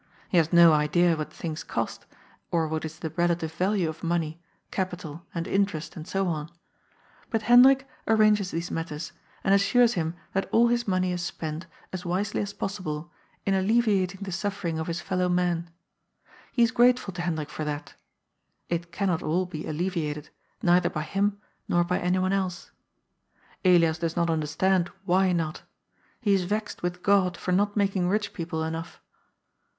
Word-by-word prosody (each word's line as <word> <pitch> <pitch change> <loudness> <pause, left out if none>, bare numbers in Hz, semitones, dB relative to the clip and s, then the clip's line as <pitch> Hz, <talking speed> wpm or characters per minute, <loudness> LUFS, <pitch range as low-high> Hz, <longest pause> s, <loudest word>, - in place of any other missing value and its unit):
He 180 - +2
has 165 -1 +3
no 170 -2 +8
idea 165 +3 +3
what 155 -1 -5
things 160 -2 -5
cost, - - -4 0.4
or 165 -2 +1
what 160 0 -3
is 155 0 -7
the 160 - -5
relative 170 -1 0
value 185 +1 +1
of 160 0 -6
money, 165 -1 -1 0.3
capital 175 -3 -4
and 170 -1 -3
in* 200 0 +3
terest 160 -5 -7
and 160 0 -8
so 195 0 0
on. 155 -2 -2 0.8
But 225 -1 -1
Hendrik 260 +4 +7 0.2
arranges 215 -3 +4
these 170 +1 -4
matters, 160 -1 -4 0.3
and 195 - +3
assures 235 +4 +4
him 165 -1 -2 0.2
that 195 - -1
all 235 +1 +5
his 240 -1 0
money 185 -1 +1
is 175 -1 -2
spent, 160 -1 -5 0.3
as 185 -1 -4
wisely 190 +3 -1
as 205 -1 -3
possible, 175 -6 -4 0.3
in 195 - +2
alleviating 195 -2 +2
the 195 - -5
suffering 180 -3 -2
of 160 - -3
his 170 0 -3
fellow 180 0 0
men. 175 -1 0 0.8
He 240 - +3
is 230 - +3
grate 245 0 +5
ful 195 -6 -7
to 175 - -4
Hendrik 160 -4 -2
for 155 - -4
that 150 -1 -4 0.8
It 170 0 -2
cannot 180 -2 0
all 175 +4 0
be 155 -4 -6
alleviated, 155 -2 -2 0.3
neither 175 +1 +4
by 155 - -3
him, 200 +4 0 0.3
nor 175 0 +3
by 180 +1 0
anyone 185 +1 +1
else. 185 -3 -2 0.9
Elias 170 -3 +4
does 165 -1 -2
not 170 -1 +1
understand 170 +4 +1 0.2
why 185 0 +3
not 165 -3 -1 0.6
He 210 -4 +2
is 190 -2 +2
vexed 210 +3 -3
with 180 0 -3
God 190 -3 +3
for 180 - -3
not 205 +3 +2
making 195 -3 +1
rich 210 +1 0
people 165 -2 -3
enough. 160 +1 -5
180 Hz, 170 wpm, -27 LUFS, 165-195 Hz, 0.9 s, no